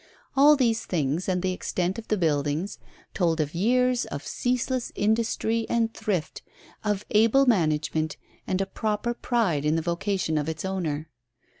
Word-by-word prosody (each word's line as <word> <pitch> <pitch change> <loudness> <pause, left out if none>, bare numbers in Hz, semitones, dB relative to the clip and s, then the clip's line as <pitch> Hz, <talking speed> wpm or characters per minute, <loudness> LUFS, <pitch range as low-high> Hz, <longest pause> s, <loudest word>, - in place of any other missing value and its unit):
All 290 +2 +7
these 230 -5 +1
things, 160 +2 -1
and 180 -1 0
the 185 -1 +1
extent 180 +2 -2
of 225 - -10
the 215 - +1
buildings, 150 +2 0 0.3
told 165 -3 +1
of 150 -1 -1
years 250 +6 +2
of 140 - -6
ceaseless 250 0 -1
industry 225 +1 0
and 230 -1 +1
thrift, 185 -7 -2 0.4
of 210 -1 -1
able 230 +6 +5
management 155 - +1 0.3
and 185 +1 0
a - - +1
proper 215 +4 -2
pride 225 - 0
in 150 +1 +2
the 165 - +1
vocation 170 -2 -1
of 150 +1 -2
its 160 +2 -4
owner. 165 -5 -2
190 Hz, 155 wpm, -26 LUFS, 160-230 Hz, 0.4 s, All